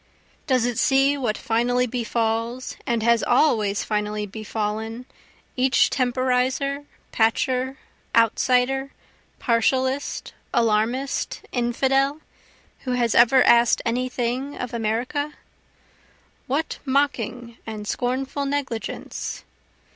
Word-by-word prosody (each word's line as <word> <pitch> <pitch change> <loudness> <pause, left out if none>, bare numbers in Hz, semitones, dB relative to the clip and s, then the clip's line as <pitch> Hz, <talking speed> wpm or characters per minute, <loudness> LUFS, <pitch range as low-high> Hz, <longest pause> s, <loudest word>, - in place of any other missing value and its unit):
Does 255 -4 +2
it 245 -2 -1
see 270 +1 +4
what 240 -7 -1
finally 245 +2 +1
befalls, 235 0 -2
and 235 -3 0
has 235 0 +4
always 220 -6 +2
finally 210 0 -2
befallen, 220 +2 -4 0.5
each 260 +1 +3
temporizer, 260 +2 0 0.3
patcher, 255 +4 +1 0.4
outsider, 250 +4 +2 0.5
partialist, 260 +3 0 0.2
alarmist, 235 +4 0
infidel, 270 +4 +1 0.6
who 255 - -3
has 240 -2 +1
ever 245 +2 +6
ask'd 235 0 +4
any 250 +2 0
thing 255 +3 -2
of 250 -1 -5
America? 240 +7 -2 1.1
What 285 +5 -2
mocking 245 -4 -1
and 215 -2 -6
scornful 265 +4 -2
negligence? 275 -5 -4
245 Hz, 95 wpm, -23 LUFS, 230-265 Hz, 1.1 s, ever